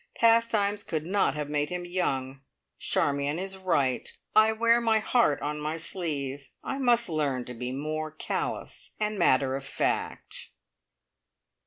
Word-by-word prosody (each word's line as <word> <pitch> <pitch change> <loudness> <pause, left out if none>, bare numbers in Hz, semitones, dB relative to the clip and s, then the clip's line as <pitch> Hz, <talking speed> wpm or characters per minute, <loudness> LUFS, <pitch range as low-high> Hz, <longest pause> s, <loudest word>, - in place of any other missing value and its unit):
Pastimes 225 -3 +3
could 155 -2 -3
not 185 -6 +2
have 150 -1 -3
made 150 0 0
him 180 0 -4
young! 135 -7 -2 0.4
Charmion 140 +2 +1
is 190 +1 -4
right. 145 -9 0 0.2
I 215 0 +7
wear 230 +1 +3
my 225 -1 +3
heart 220 - +2
on 150 +1 -2
my 155 +2 -2
sleeve. 145 -5 -4
I 270 - -3
must 240 -3 +3
learn 145 -6 -1
to 125 - -7
be 125 +1 -4
more 155 +3 -3
callous 155 - -4
and 210 -1 -1
matter 130 -5 +3
of 135 - -4
fact! 135 - -2
155 Hz, 145 wpm, -28 LUFS, 140-210 Hz, 0.4 s, I